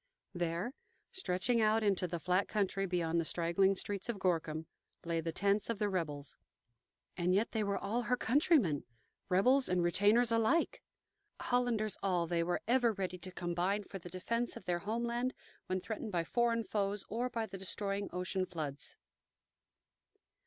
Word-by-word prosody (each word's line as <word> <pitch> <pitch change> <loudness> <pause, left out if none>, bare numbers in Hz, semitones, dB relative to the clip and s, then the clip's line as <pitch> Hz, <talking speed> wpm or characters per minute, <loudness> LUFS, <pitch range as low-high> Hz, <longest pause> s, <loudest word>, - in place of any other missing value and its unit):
There, 175 +6 -2 0.4
stretching 230 - +1
out 215 +1 +3
into 195 -3 +2
the 170 0 -3
flat 180 +4 +1
country 195 -2 0
beyond 170 -2 +1
the - - +1
straggling 170 +4 +2
streets 200 +3 -3
of 235 - -1
Gorkum, 160 -4 0 0.4
lay 165 -1 0
the 165 +1 -2
tents 200 +5 +1
of 230 - 0
the 205 0 0
rebels. 150 -7 -3 0.8
And 180 +1 +2
yet 210 +4 +1
they 220 -2 0
were 200 -1 0
all 220 +5 -1
her 250 +1 +1
countrymen 245 - +3 0.5
rebels 255 +8 +4
and 180 -1 +2
retainers 210 +7 +4
alike. 230 +9 +2 0.6
Hollanders 240 -4 +1
all, 180 -3 +1
they 170 0 0
were 175 +1 0
ever 240 -1 +4
ready 185 -2 -3
to 185 +2 -8
combine 180 +3 -1
for 195 0 -8
the 175 - -9
defence 230 +7 -2
of - - -12
their 175 -1 0
homeland 235 +5 -1 0.3
when 185 0 0
threatened 220 +2 -5
by 170 -3 +1
foreign 230 +4 +1
foes 205 -1 -1
or 240 +3 -1
by 230 -2 -2
the 195 -2 -8
destroying 195 +2 -2
ocean 185 +1 -2
floods. 150 -6 -5
195 Hz, 160 wpm, -34 LUFS, 175-225 Hz, 0.8 s, rebels